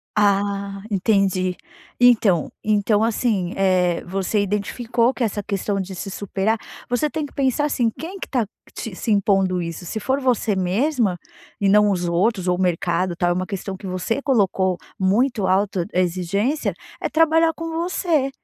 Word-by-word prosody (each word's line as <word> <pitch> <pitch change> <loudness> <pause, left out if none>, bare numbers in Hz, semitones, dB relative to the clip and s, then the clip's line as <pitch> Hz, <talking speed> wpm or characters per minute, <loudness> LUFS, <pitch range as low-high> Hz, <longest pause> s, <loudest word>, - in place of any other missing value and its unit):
Ah, 200 -1 +1
entendi. 190 -2 +1 0.4
Então 225 -9 +4
então, 210 0 +2
assim, 220 -5 0
eh, 185 -3 +2
você 195 +3 0
identificou 230 +4 0
que 255 - -2
essa 210 -2 -1
questão 200 0 -2
de 190 0 -5
se 195 +2 -5
superar 205 +3 -1 0.3
você 250 +5 +1
tem 310 0 -3
que 285 - -12
pensar 275 +1 +1
assim: 250 -5 +1
quem 340 - -8
que - - -5
está 245 -5 0 0.3
te 225 - -5
se 180 - -5
impondo 195 -3 +2
isso? 170 +1 -6
Se 220 +5 -4
for 265 +5 0
você 250 -5 +1
mesma 200 - +1 0.4
e 200 - +3
não 210 +1 +5
os 180 -3 0
outros, 190 +2 +1
ou 180 - +2
o - - -2
mercado, 180 0 0
tal, 175 +1 +1
é - - +3
uma 185 +1 -2
questão 195 -2 -5
que 195 - -8
você 185 +8 -2
colocou 195 -8 +1 0.2
muito 210 +2 +2
autoexigência, 190 - 0 0.3
é - - 0
trabalhar 325 0 +3
com 330 +1 -6
você 330 -4 0
200 Hz, 165 wpm, -22 LUFS, 185-240 Hz, 0.4 s, não